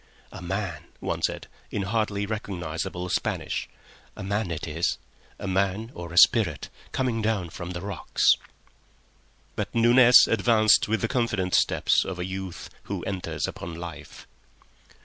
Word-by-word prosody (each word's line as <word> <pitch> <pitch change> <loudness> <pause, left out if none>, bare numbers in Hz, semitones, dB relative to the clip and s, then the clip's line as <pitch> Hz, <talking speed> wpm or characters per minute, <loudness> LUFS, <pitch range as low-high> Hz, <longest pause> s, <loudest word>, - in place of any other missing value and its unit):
"A - - -9
man," 90 -3 -4
one - - -3
said, - - -1 0.2
in 100 - -2
hardly 100 0 -1
recognisable 90 -4 -4
Spanish. - - -2 0.5
"A - - -6
man 100 0 -1
it 85 -1 -4
is—a 80 +4 -4
man 95 +4 0
or 85 -1 -8
a 85 - -7
spirit—coming 115 - +2
down 105 -6 -1
from 85 0 -7
the 85 -1 -5
rocks." 100 -2 +2 1.2
But - - -4
Nunez 120 +1 +7
advanced 110 0 +4
with 110 +1 0
the 115 - +1
confident 105 -7 -1
steps - - +3
of 95 - -5
a 90 - -3
youth 95 -1 -6
who - - -4
enters 95 -2 -3
upon 85 0 -7
life. 85 0 -9
95 Hz, 135 wpm, -26 LUFS, 90-110 Hz, 1.2 s, Nunez